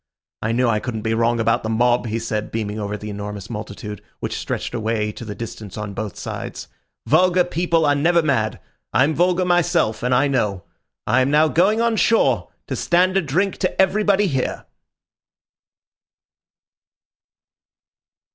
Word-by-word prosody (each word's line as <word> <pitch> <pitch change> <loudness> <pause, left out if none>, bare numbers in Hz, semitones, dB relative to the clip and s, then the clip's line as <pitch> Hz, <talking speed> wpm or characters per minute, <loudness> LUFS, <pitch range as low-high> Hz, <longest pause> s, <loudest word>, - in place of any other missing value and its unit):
I 110 - -1
knew 125 +2 +2
I 110 -2 +2
couldn't 110 -2 -5
be 110 - 0
wrong 115 +1 +1
about 115 +1 +2
the 110 - -4
mob," 120 +2 +2
he 110 +1 -2
said, 110 -2 -3
beaming 110 -1 -3
over 105 0 -3
the 105 0 -7
enormous 105 +1 -6
multitude, 105 -1 -7 0.2
which - - -3
stretched - - -4
away 110 -2 -1
to 115 - -9
the 105 -2 -6
distance 110 -3 -8
on 105 -1 -5
both 105 -1 -5
sides. - - -6 0.4
"Vulgar 180 +3 +4
people 170 -2 +1
are 145 - +4
never 165 +4 +3
mad. 110 -8 0 0.3
I'm 140 +4 +3
vulgar 180 +2 +2
myself, 175 - +2
and 125 - -1
I 135 +3 +3
know. 105 -9 -1 0.4
I 130 - +3
am 130 - +2
now 155 +2 +4
going 200 +8 +3
on 230 -1 +1
shore 225 +1 +2 0.2
to - - -4
stand 180 +2 +2
a 195 - +4
drink 180 +6 -1
to 185 - -2
everybody 205 +1 +3
here." 135 -8 -2
125 Hz, 160 wpm, -21 LUFS, 110-175 Hz, 0.4 s, Vulgar